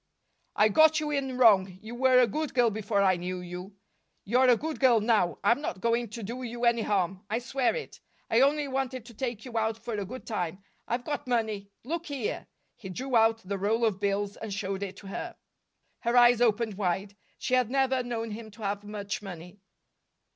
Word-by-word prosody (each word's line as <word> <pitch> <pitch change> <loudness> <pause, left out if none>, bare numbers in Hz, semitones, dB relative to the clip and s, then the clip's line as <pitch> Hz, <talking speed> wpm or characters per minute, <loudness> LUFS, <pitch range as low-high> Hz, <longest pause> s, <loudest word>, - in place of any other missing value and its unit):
"I 210 +1 +5
got 315 +6 +5
you 300 -1 -2
in 270 -3 -2
wrong. 195 -6 +5
You 220 +3 -9
were 255 +1 +4
a 250 - +6
good 300 +7 -3
girl 240 -3 +4
before 205 -1 0
I 185 -2 +4
knew 180 +1 -4
you. 180 +2 -8 0.5
You're 250 +5 +3
a 240 - +6
good 315 +5 -4
girl 250 -4 +5
now. 210 -5 +2
I'm 235 +7 +3
not 190 -10 -4
going 235 +2 +1
to 230 +1 -7
do 235 +6 -5
you 240 0 -3
any 235 -1 +3
harm, 190 -2 0
I 220 - 0
swear 250 - 0
it. 480 - -7 0.3
I 230 - +3
only 290 +1 +3
wanted 260 -2 -3
to 235 - -12
take 235 -1 -4
you 235 -3 -2
out 220 0 0
for 235 - -3
a 205 -1 -2
good 255 +6 -8
time. 190 -3 -3 0.2
I've 240 +1 -2
got 295 -4 -3
money. 220 -5 -1
Look 335 +7 -4
here!" 275 -7 -3 0.3
He 190 - -9
drew 255 +7 -3
out 225 0 +4
the 200 0 -2
roll 220 +4 +1
of 205 -4 0
bills 200 0 -1
and 220 -2 -6
showed 195 -1 -3
it 195 -1 -5
to 195 - -11
her. - - -5 0.6
Her 235 +1 +1
eyes 240 -1 +6
opened 220 -3 +1
wide. 195 +1 -1 0.2
She - - -3
had 250 -3 +3
never 265 0 +2
known 230 -2 -4
him 220 +1 -7
to 215 +1 -12
have 200 0 -2
much 205 0 -5
money. 180 -1 -9
225 Hz, 210 wpm, -28 LUFS, 200-250 Hz, 0.6 s, a